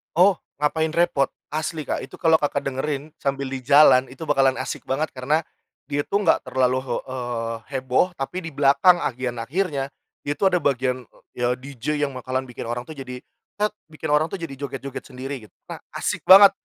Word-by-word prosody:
Oh, 185 +1 +5 0.2
"Ngapain 160 +1 +1
Repot" 170 -5 +3 0.2
asli, 155 0 -2
Kak. - - -2
Itu - - -9
kalau 160 -2 +4
Kakak 145 - -1
dengerin 140 +2 -3
sambil 140 -1 -2
di 135 - -3
jalan, 135 -1 +6
itu 130 +5 -9
bakalan 135 -3 +3
asik - - -5
banget. 145 +4 -1
Karena 145 +5 0 0.5
dia 145 +1 +1
tuh 200 +1 +1
enggak 170 - +4
terlalu 130 0 +2
he - - -1 0.2
eee, 120 -3 -3 0.2
heboh. 130 +8 +1
Tapi 135 +6 -3
di - - -6
belakang, 145 +6 +5
bagian 125 -1 -2
akhirnya, 140 +1 -1 0.3
dia 145 - -1
tuh 195 - +4
ada - - +3
bagian 130 -2 +1 0.3
ya, 120 0 +1
DJ 140 +2 -3
yang 135 - -9
bakalan 130 +1 -3
bikin 125 - -7
orang 120 +1 -4
tuh 160 - -8
"tet" 135 - -6
jadi 125 -1 -7 0.8
bikin 155 +1 -6
orang 150 +2 +4
tuh 195 - -4
joget-joget 140 -3 -6
sendiri 130 -3 -7
gitu. - - -37
Nah, - - -7 0.2
asik - - -2
banget. 195 +1 +10
140 Hz, 185 wpm, -23 LUFS, 130-155 Hz, 0.8 s, banget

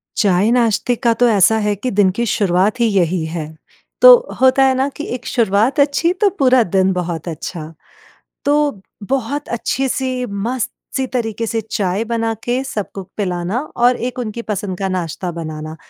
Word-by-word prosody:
चाय-नाश्ते 225 +4 +2
का 235 0 +1
तो 245 +2 +2
ऐसा 220 +1 +4
है 210 -1 +1
कि 245 +6 -3
दिन 200 -1 +3
की 235 - +1
शुरुआत 200 +1 +1
ही 235 - +3
यही 180 -5 +1
है। 160 -1 -5 0.5
तो - - +11 0.3
होता 260 +1 +5
है 265 0 +4
ना 265 +1 +1
कि 300 - -4
एक 250 - -9
शुरुआत 225 +5 +1
अच्छी 285 +4 +2
तो 415 - +5
पूरा 260 -2 +5
दिन 190 -1 +1
बहुत 175 -2 -4
अच्छा। 160 0 -6 0.7
तो 290 -6 +1 0.2
बहुत 270 +5 -2
अच्छे 265 +3 -1
से 255 -1 -2
मस्त-सी 235 +5 -4
तरीके 230 -3 -3
से 225 0 -1
चाय 195 +2 -1
बना 230 0 -1
के 245 +2 0
सबको 205 -6 -5
पिलाना 185 +3 -2 0.2
और 245 +1 +3
एक 250 +1 -4
उनकी 235 -1 -4
पसंद 200 -4 -4
का 195 -1 -1
नाश्ता 180 -1 -3
बनाना, 155 -1 -6
220 Hz, 165 wpm, -18 LUFS, 185-250 Hz, 0.7 s, तो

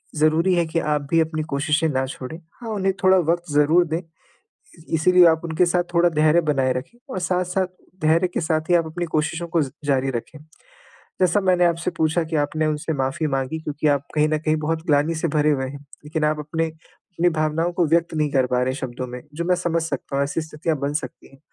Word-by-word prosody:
ज़रूरी 155 +4 +3
है 170 -1 +2
कि 160 +1 -1
आप 150 -2 0
भी 165 - +4
अपनी 155 -1 0
कोशिशें 150 +3 +1
ना 130 -2 0
छोड़ें 130 +4 -7 0.2
हाँ, 230 - -6
उन्हें 195 -3 0
थोड़ा 190 0 +6
वक़्त 175 -1 -3
ज़रूर 150 +4 +4
दें, 160 +1 -1
इ - - -12 0.9
इसीलिए 180 +2 +5
आप 160 -1 +4
उनके 165 +2 +2
साथ 175 0 +2
थोड़ा 170 +1 +5
धैर्य 155 0 +3
बनाए 135 -5 +1
रखें 125 - -6
और - - -3
साथ-साथ 180 +1 0 0.3
धैर्य 165 +3 +3
के - - 0
साथ 160 -1 -1
ही 175 - +5
आप 165 -2 +3
अपनी 175 +2 -4
कोशिशों 160 +2 -1
को 165 -1 +1
ज 135 - -4
जारी 135 -1 +1
रखें। 125 +5 -6 0.8
जैसा 185 +2 +3
मैंने 185 -2 +3
आपसे 170 -1 +1
पूछा 160 +2 +1
कि 160 0 -3
आपने 155 +2 0
उनसे 155 +1 -1
माफ़ी 135 +4 -1
माँगी 135 +2 -2
क्योंकि 150 0 -1
आप 145 -1 +1
कहीं 150 0 +3
न 155 0 +1
कहीं 155 0 0
बहुत 160 +1 -2
ग्लानि 150 +2 +2
से 160 +1 -1
भरे 150 0 +2
हुए 130 -2 -1
हैं 140 - -8 0.3
लेकिन 155 +1 -2
आप 150 0 +1
अपने 160 +2 -2
अपनी 165 +2 -4
भावनाओं 160 +1 0
को 175 -1 +1
व्यक्त 165 +1 +1
नहीं 150 -1 0
कर 130 -2 +3
पा 125 0 0
रहे 130 +1 0
शब्दों 130 -1 -5
में, 125 0 -7
जो 170 - -3
मैं 180 +1 +2
समझ 170 -2 -1
सकता 160 -3 -4
हूँ 140 - +2
ऐसी 145 - -2
स्थितियाँ 160 0 -3
बन 140 +1 -2
सकती 150 - -5
हैं, 135 - -18
160 Hz, 225 wpm, -22 LUFS, 150-170 Hz, 0.9 s, थोड़ा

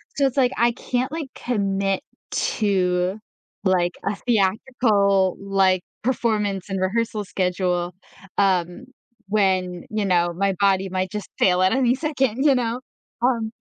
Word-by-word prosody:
So 280 - +2
it's 265 - -5
like, 255 -2 +4
I 235 0 +4
can't, 255 +3 -2
like, 315 -3 -4
commit 195 -4 -1 0.3
to, 185 -3 0 0.5
like, 180 -2 +2
a 200 - 0
theatrical, 200 -3 +2
like, 195 -2 +2 0.2
performance 210 -6 0
and 195 -1 -2
rehearsal 215 +2 -1
schedule, 180 -1 -1 0.4
um, 185 +3 +1 0.4
when, 185 -3 0
you 215 -1 -1
know, 175 -2 +2
my 195 +1 +1
body 195 -1 +2
might 185 0 -2
just 210 -2 -5
fail 180 -1 +4
at 185 0 +4
any 255 -1 +3
second, 270 -5 -1
you 275 - +6
know? 240 -1 -1 0.4
Um, 235 -3 +1
200 Hz, 135 wpm, -23 LUFS, 185-235 Hz, 0.5 s, you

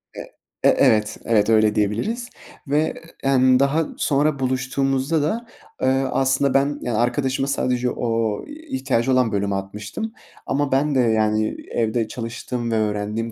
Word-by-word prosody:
Eee, - - -8 0.3
e - - +6
evet, 105 -1 +3
evet. 110 -1 +2
Öyle 110 -1 +4
diyebiliriz 120 - -1 0.4
ve, 145 - +1
eee, - - -4 0.3
emm, 130 -1 +4
daha 145 +4 +2
sonra 145 0 +1
buluştuğumuzda 135 +3 0
da, 220 +11 -1 0.4
eee, 130 - +2 0.2
aslında 135 +1 +2
ben, 140 +1 +1
yani, 120 -3 -2
arkadaşıma 130 +3 0
sadece 125 -2 0
o 115 -3 -1
ihtiyacı 265 - -2
olan 125 -3 +3
bölümü 100 -1 -1
atmıştım. 105 - -5 0.3
Ama 140 +1 -1
ben 140 +2 +2
de, 130 - +3
yani, 110 -2 +2 0.2
evde 115 0 0
çalıştığım 120 0 -4
ve - - +1
öğrendiğim 105 +1 -1
125 Hz, 145 wpm, -22 LUFS, 110-140 Hz, 0.4 s, e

